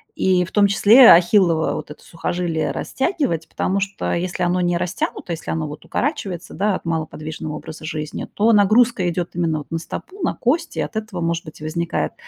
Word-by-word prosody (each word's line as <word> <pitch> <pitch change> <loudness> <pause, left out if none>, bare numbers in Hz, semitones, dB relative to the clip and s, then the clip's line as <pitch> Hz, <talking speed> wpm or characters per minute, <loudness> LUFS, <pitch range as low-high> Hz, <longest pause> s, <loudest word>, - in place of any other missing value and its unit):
и 185 -1 +2
в 185 - -13
том 205 -1 +5
числе 225 +5 +7
ахиллова 175 -2 +4
вот 150 - -6
это 150 - -12
сухожилие 170 -1 -2
растягивать, 265 - -2
потому 195 +2 -1
что 195 0 -2
если 180 +1 -2
оно 180 +1 +1
не 175 -1 +1
растянуто, 175 0 -3
если 165 - -5
оно 160 -2 -2
укорачивается, 180 - -4
да, 205 0 0
от - - -7
малоподвижного 155 -1 -4
образа 160 0 -9
жизни, 155 -1 -4
то 225 +2 +3
нагрузка 215 -1 +4
идёт 175 0 -3
именно 165 -3 0
вот 145 - -12
на 165 - -1
стопу, 380 - -8
на - - +1
кости, 320 +7 -1
и - - +2
от - - -5
этого, 215 -4 -4
может 170 0 -1
быть, 155 - -11
возникает, 170 +2 -2
175 Hz, 185 wpm, -21 LUFS, 160-205 Hz, -, числе